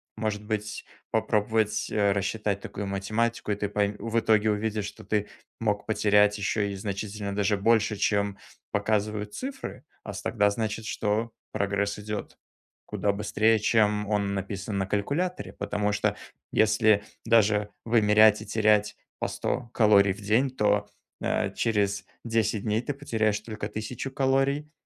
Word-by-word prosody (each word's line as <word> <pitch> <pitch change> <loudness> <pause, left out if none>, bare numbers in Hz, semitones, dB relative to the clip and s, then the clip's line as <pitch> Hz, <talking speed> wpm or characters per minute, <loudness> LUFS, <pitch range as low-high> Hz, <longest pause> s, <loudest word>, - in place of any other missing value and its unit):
Может 105 -1 -3
быть, 105 -1 -3 0.2
попробовать, 110 0 +1
э, 100 -2 +2
рассчитать 100 +1 -1
такую 100 - -5
математику, 105 +4 -1
и - - +1
ты 105 0 -2
пой 105 0 0
в 115 +2 0
итоге 110 -1 +3
увидишь, 105 0 -1
что - - -9
ты 105 -1 -1 0.3
мог 105 -2 -1
потерять 105 -1 +4
еще 100 0 0
и - - -5
значительно 100 +1 -4
даже 105 0 +1
больше, 105 +1 +3
чем 100 -1 0 0.3
показывают 105 0 -1
цифры. 270 +1 -6 0.2
А 105 - -6
с 100 - -6
тогда 105 -2 +2
значит, 110 0 -3
что 110 +2 -1 0.2
прогресс 100 0 -1
идет 105 0 -5 0.5
куда 105 - 0
быстрее, 110 +2 +2
чем 105 -1 +2
он 100 -2 0
написан 100 +1 -4
на 95 - -1
калькуляторе. 145 - -2
Потому 105 0 -1
что, 105 - 0 0.4
если 110 -1 +4 0.2
даже 105 -2 +3 0.2
вымерять 110 -2 +5
и - - -7
терять 105 -1 +2 0.2
по - - 0
100 120 -2 -3
калорий 100 -3 +5
в 100 - -12
день, 110 +7 +2
то, 105 -4 +1 0.3
э, - - 0
через 105 -3 0 0.2
10 110 -3 0
дней 110 +1 0
ты 145 - -3
потеряешь 110 -7 0
только 110 0 -6
1000 110 +5 -5
калорий, 135 +2 +1
105 Hz, 145 wpm, -27 LUFS, 100-110 Hz, 0.5 s, вымерять